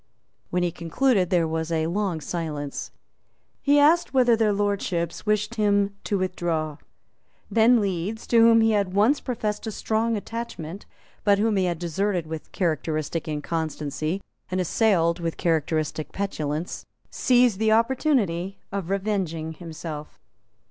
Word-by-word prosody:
When 180 0 0
he 175 - +1
concluded 185 +3 +1
there 170 -3 +2
was 160 +1 -2
a 160 -1 +1
long 180 -1 -1
silence. 150 -3 -4 0.7
He 285 +1 +4
asked 310 +1 +4
whether 245 -3 +5
their 220 -2 +2
Lordships 200 -3 -1
wished 210 +1 +1
him 200 -1 +2
to 205 - 0
withdraw. 170 -5 -2 0.7
Then 230 +2 +5
Leeds, 200 +2 -2
to 235 - +3
whom 230 0 +7
he 225 0 +4
had 200 -3 0
once 225 +9 +4
professed 220 -4 -3
a - - -2
strong 225 +2 0
attachment, 200 -5 -6 0.4
but 200 -1 +4
whom 215 +1 +2
he 190 -1 +2
had 175 -2 -1
deserted 175 +1 -1
with 160 0 -7
characteristic 160 -2 -1
inconstancy 155 +2 -3 0.3
and 185 - -1
assailed 180 -3 +2
with 165 -1 -3
characteristic 155 -2 -1
petulance, 160 -5 -3 0.3
seized 245 -5 +3
the 220 0 +3
opportunity 220 - +1
of 195 -3 -4
revenging 190 -6 -1
himself. 155 -2 -8
190 Hz, 135 wpm, -25 LUFS, 165-220 Hz, 0.7 s, whom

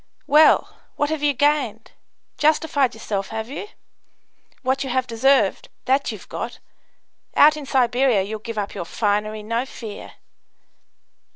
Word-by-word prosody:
"Well! 305 +2 +4 0.2
What 290 +1 0
have 315 -2 -2
you 295 -1 +2
gained? 265 -6 0 0.5
justified 295 -4 +2
yourself, 200 -3 -3
have 220 +1 -5
you? 290 +9 -6 1.0
What 265 +2 0
you 265 - -5
have 255 +1 0
deserved, 230 -2 +2 0.2
that 270 +2 +1
you've - - -10
got. - - -5 0.8
Out 300 +1 +7
in 295 -3 -8
Siberia 245 -4 +2
you'll 215 +2 -5
give 230 0 -7
up 205 -1 -3
your 175 - -5
finery, 210 +2 -1
no 230 +3 -1
fear!" 225 -5 -9
250 Hz, 135 wpm, -22 LUFS, 220-285 Hz, 1.0 s, Out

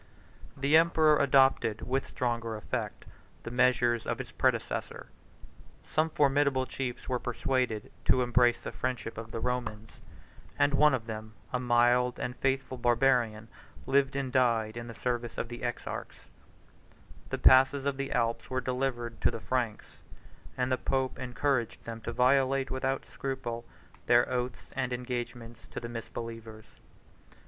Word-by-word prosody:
The 140 +3 +3
emperor 160 -2 +4
adopted, 135 -5 +3
with 135 +2 -1
stronger 115 -2 -2
effect, 105 - -4 0.4
the 120 - -6
measures 120 -2 +2
of - - -1
his - - -7
predecessor: - - -1 0.7
some 155 +1 0
formidable 140 -3 +2
chiefs 130 -2 -5
were 125 -1 0
persuaded 125 -3 -1
to 130 - +4
embrace 120 0 +3
the - - -4
friendship 125 -2 -3
of 115 0 -7
the 115 - -4
Romans; 110 -3 -4 0.6
and 145 0 +3
one 150 -1 +5
of 115 -3 -5
them, 110 -1 -7 0.2
a 125 - +1
mild 120 0 +3
and 125 - -3
faithful 135 -1 -1
Barbarian, 120 -3 +2 0.4
lived 135 0 +2
and 135 -2 -2
died 115 -4 +2
in 120 0 -6
the 115 - -8
service 120 -1 -3
of 115 - -3
the 120 0 -7
exarchs: 120 -1 -5 1.0
the - - -2
passes 135 +1 +5
of 140 -1 0
the 140 0 -3
Alps 115 -1 0
were 130 - 0
delivered 125 -2 -2
to - - +4
the - - -5
Franks; 120 -3 -3 0.6
and 125 0 0
the 130 - +1
pope 130 -1 -1
encouraged 125 -2 -1
them 115 -1 -6
to 115 - -4
violate, 135 +2 +2
without 135 0 -1
scruple, 120 -3 -5 0.4
their 120 0 +5
oaths 125 0 -3
and 125 -1 -1
engagements 120 -2 -5
to - - -6
the 120 - -7
misbelievers. 115 -1 -7
125 Hz, 145 wpm, -30 LUFS, 115-135 Hz, 1.0 s, one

